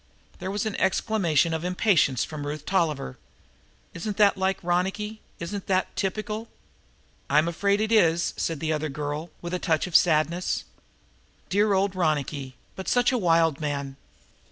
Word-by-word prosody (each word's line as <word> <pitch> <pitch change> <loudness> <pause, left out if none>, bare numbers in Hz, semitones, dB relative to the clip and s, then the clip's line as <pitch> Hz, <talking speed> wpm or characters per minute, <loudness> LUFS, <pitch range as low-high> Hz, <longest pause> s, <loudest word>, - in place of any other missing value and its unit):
There - - -4
was 205 +2 -2
an 215 - -2
exclamation 185 -5 +2
of 160 0 -2
impatience 180 - +2
from 145 -2 -5
Ruth 150 0 -5
Tolliver. 155 - -1 0.7
"Isn't 200 +4 -4
that 205 -2 +5
like 190 0 0
Ronicky? 195 +5 -1 0.2
Isn't 185 +4 -5
that 190 -1 0
typical?" 215 +3 -3 0.8
"I'm 150 +3 +4
afraid 200 +4 +1
it 220 +1 0
is," 170 -6 +3
said 165 -3 -2
the 160 -1 0
other 155 0 -2
girl 150 +3 -4
with 175 +1 -5
a 180 - 0
touch 160 -5 +1
of 180 -3 -6
sadness. 170 +2 +3 0.9
"Dear 205 +1 +3
old 195 0 +1
Ronicky, 145 -6 -1 0.2
but 190 - -7
such 245 +1 +3
a 255 - +1
wild 165 -5 +3
man!" 140 -2 -3
175 Hz, 155 wpm, -26 LUFS, 155-200 Hz, 0.9 s, that